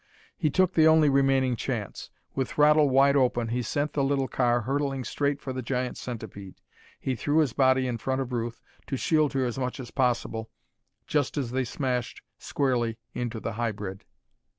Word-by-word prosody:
He 155 - 0
took 185 +5 +2
the 160 -1 +5
only 160 -2 +6
remaining 135 -2 +3
chance. 115 -4 -4 0.2
With 130 -2 -1
throttle 150 0 +4
wide 135 +2 +5
open 120 -4 +2
he 125 +2 -1
sent 145 +5 -2
the 140 - +1
little 135 -1 +1
car 120 -2 +1
hurtling 135 +2 -1
straight 140 +3 -1
for 130 - -5
the 130 - -3
giant 125 0 -2
centipede. 105 -5 -7 0.4
He 130 - -2
threw 145 +5 0
his 150 -7 +3
body 130 -1 +3
in 120 -2 -2
front 130 +3 -1
of 130 -2 -3
Ruth, 115 -1 -3 0.2
to 135 - -2
shield 155 +1 +2
her 135 -1 +1
as 120 +1 -3
much 125 +1 -3
as 125 -3 -8
possible, 120 -3 -1 0.6
just 145 -1 0
as 130 -5 -2
they 130 0 0
smashed 125 -1 -3 0.2
squarely 120 -5 0 0.2
into 120 -2 -3
the 115 - -4
hybrid. 105 -4 -4
130 Hz, 180 wpm, -27 LUFS, 120-140 Hz, 0.6 s, only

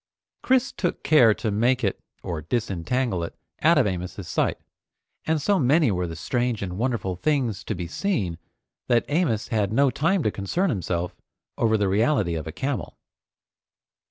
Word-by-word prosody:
Chris 260 0 +2
took 175 - -3
care 125 -8 +6
to 110 +1 -1
make 120 +4 +2
it 100 - 0 0.2
or 85 -3 -4
disentangle 105 - -1
it 85 - -6 0.3
out 165 +2 +5
of 135 - +4
Amos's 90 -1 -4
sight, - - 0 0.7
and 160 0 +1
so 195 +7 +2
many 140 -1 +4
were 90 -2 -1
the 80 - -6
strange 120 +4 -1
and 90 -2 -4
wonderful 115 -4 -1
things 125 - 0
to 110 - -2
be 90 -1 -4
seen, 90 - -2 0.5
that 120 -2 +3
Amos 145 - 0
had 105 -3 0
no 135 +4 +3
time 165 +5 +1
to 105 - +1
concern 160 - -1
himself 90 - -2 0.4
over 110 -1 +2
the 100 -1 +1
reality 105 - +2
of 80 -1 -4
a - - -4
camel. 130 - -4
115 Hz, 165 wpm, -25 LUFS, 95-140 Hz, 0.7 s, care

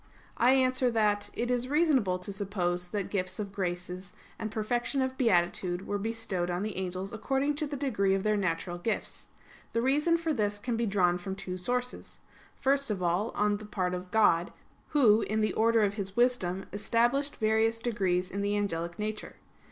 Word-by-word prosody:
I 250 +2 +5
answer 255 -1 +3
that, 210 -3 +1
It 240 +1 -1
is 250 0 0
reasonable 275 - +2
to 180 +2 -4
suppose 180 -3 -1
that 200 +1 -3
gifts 185 -2 -2
of 205 -2 -4
graces 180 -1 -4 0.3
and 220 - -3
perfection 240 +5 -1
of 260 0 0
beatitude 180 -5 +1
were 205 - -2
bestowed 210 -5 -2
on 175 +2 -1
the 215 -1 -3
angels 185 +2 -4
according 270 +6 0
to 305 -1 -1
the 285 0 -4
degree 205 -9 +1
of 195 - -2
their 215 0 +2
natural 175 -2 -2
gifts. 215 +4 -3 0.5
The 230 - +1
reason 300 +6 +3
for 330 -1 -1
this 205 -5 0
can 235 +3 -2
be 230 0 0
drawn 180 -3 +2
from 190 +2 -5
two 185 -1 -5
sources. 245 +7 -3 0.4
First 275 0 +1
of 195 -4 -2
all, 180 +6 +1
on 210 0 +2
the 215 - -10
part 185 -3 -1
of 180 0 -5
God, 180 -5 +3 0.4
Who, 230 -7 +5
in 215 +1 -1
the 215 - +1
order 225 0 +3
of 200 -1 +1
His 195 -1 -5
wisdom, 195 -7 +1
established 240 +7 +1
various 220 +1 +2
degrees 190 -6 0
in 200 - -3
the 205 +1 0
angelic 170 -4 -2
nature. 215 0 -4
210 Hz, 185 wpm, -29 LUFS, 185-240 Hz, 0.5 s, I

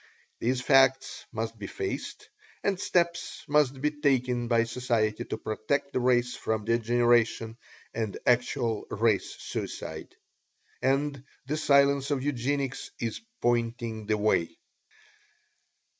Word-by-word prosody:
These 125 +2 0
facts 135 0 +3
must 115 0 -4
be 100 - -5
faced, - - -5 0.3
and 195 -2 0
steps 175 -4 0
must 145 -2 +2
be 150 +2 +1
taken 130 -5 +1
by 115 -1 +3
society 115 -3 0
to - - -4
protect 140 +7 -2
the - - +1
race 125 0 +2
from 110 -1 -2
degeneration 115 -1 +2 0.4
and 110 -3 -3
actual 120 -2 +1
Race 110 -1 +1
Suicide. - - -6 0.7
And 135 +1 0 0.2
the 145 +3 -2
Science 140 -2 +3
of 140 -3 0
Eugenics 140 0 -2
is 115 -2 -3 0.2
pointing 115 -2 0
the 110 0 +2
way. 85 -6 +1
125 Hz, 115 wpm, -28 LUFS, 115-140 Hz, 0.7 s, facts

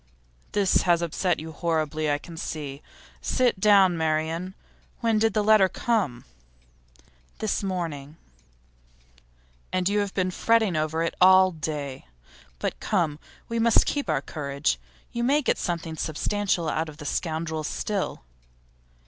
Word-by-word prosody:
'This 200 -2 +3
has 175 -1 +2
upset 175 +2 0
you 160 +1 -7
horribly, 155 -1 -1
I 145 - +2
can 165 +3 -11
see. 145 -3 -5 0.4
Sit 245 -6 +1
down, 195 -3 +5
Marian. 160 +3 -1 0.5
When 225 -2 +2
did 225 +1 +2
the 210 - +2
letter 210 -3 +5
come?' 185 - -1 1.1
'This 215 -2 -1
morning.' 165 -6 -4 1.5
'And 185 -1 +1
you 205 +1 +2
have 205 -1 -2
been 185 -1 +1
fretting 220 -2 +2
over 155 +1 0
it 165 - -1
all 185 0 +7
day. 150 - -5 0.5
But - - -3
come, 165 -8 0 0.3
we 230 0 -2
must 230 0 +4
keep 285 -1 -2
up - - +3
our - - 0
courage; 140 - -2 0.3
you 235 - -2
may 285 +4 +3
get - - +1
something 170 -2 -3
substantial 175 +3 -1
out 160 +1 -1
of 150 - -12
the 150 - -9
scoundrels 160 -1 -2
still. 205 - -3
170 Hz, 140 wpm, -26 LUFS, 155-205 Hz, 1.5 s, all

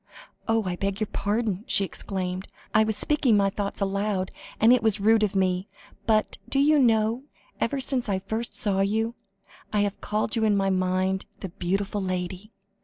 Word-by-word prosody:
"Oh! 225 -1 +2
I 180 -2 -2
beg 195 +1 -2
your 215 - +1
pardon," 205 -1 -1
she 200 - +5
exclaimed; 185 -1 -4 0.3
"I 215 - +5
was 220 -1 -1
speaking 270 -7 +2
my 195 -1 +2
thoughts 200 0 -3
aloud, 195 -1 -1 0.3
and 225 +3 +6
it 250 - +3
was 220 -2 +1
rude 220 +2 +4
of 210 -1 0
me. 185 0 +1 0.4
But, 215 -1 +1
do - - 0
you 295 +2 +5
know, 230 0 +2 0.3
ever 270 +4 0
since 260 -3 0
I 195 - +1
first 220 +5 -4
saw 195 -2 +1
you, 220 +4 0 0.6
I 210 - +2
have 205 -1 -2
called 215 +2 -1
you 225 - +1
in 210 -2 +3
my 195 0 +1
mind 185 +1 0 0.2
'the 190 - -4
beautiful 195 +3 -2
lady.' 185 +2 -4
205 Hz, 180 wpm, -26 LUFS, 190-220 Hz, 0.6 s, and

